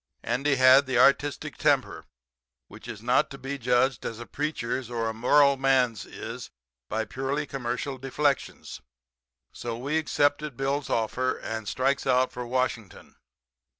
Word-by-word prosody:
Andy 135 +4 +1
had 130 +1 +6
the 130 -2 0
artistic 140 +3 +2
temper, - - 0 0.6
which - - -13
is 115 -2 -8
not 125 +2 +2
to 135 - -9
be 135 +1 -5
judged 125 +2 +1
as 115 - -5
a 120 - -7
preacher's 130 -5 -3
or 115 -2 -2
a 110 - -2
moral 140 +5 +4
man's 130 -6 +1
is - - -8 0.4
by 110 +1 -1
purely 135 +6 -3
commercial 130 0 -4
deflections. 140 +2 -2 0.7
So 115 -1 -5
we 145 +6 -1
accepted 145 -2 0
Bill's 135 +1 -1
offer, 125 +3 0
and 110 -1 -5
strikes 135 +5 0
out 130 0 +3
for 125 -1 -6
Washington. 125 -4 -3
130 Hz, 145 wpm, -26 LUFS, 120-140 Hz, 0.7 s, had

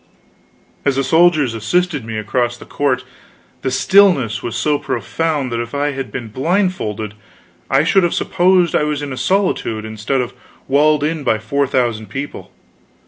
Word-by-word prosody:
As 140 -2 +1
the 135 - +1
soldiers 160 -4 +3
assisted 150 - 0
me 110 -1 -5
across 120 +3 -1
the - - -12
court 130 -3 -1 0.6
the 130 - -1
stillness 140 - +3
was 115 - -4
so 150 -1 +1
profound 155 -6 -2
that 115 0 -1
if 120 +4 -6
I 145 +1 0
had 135 -1 -5
been 120 -3 -5
blindfold 130 - -1 0.6
I 135 +2 +4
should 190 +4 +4
have 175 -2 +1
supposed 180 -1 +2
I - - +3
was 150 -1 -1
in 140 -2 -4
a - - -4
solitude 130 - 0
instead 110 +5 -2
of 125 -1 -3 0.3
walled 145 +2 +3
in 155 0 -1
by 110 - +2
four 140 +6 -1
thousand 120 -5 0
people. 135 +8 -6
135 Hz, 165 wpm, -18 LUFS, 120-160 Hz, 0.6 s, I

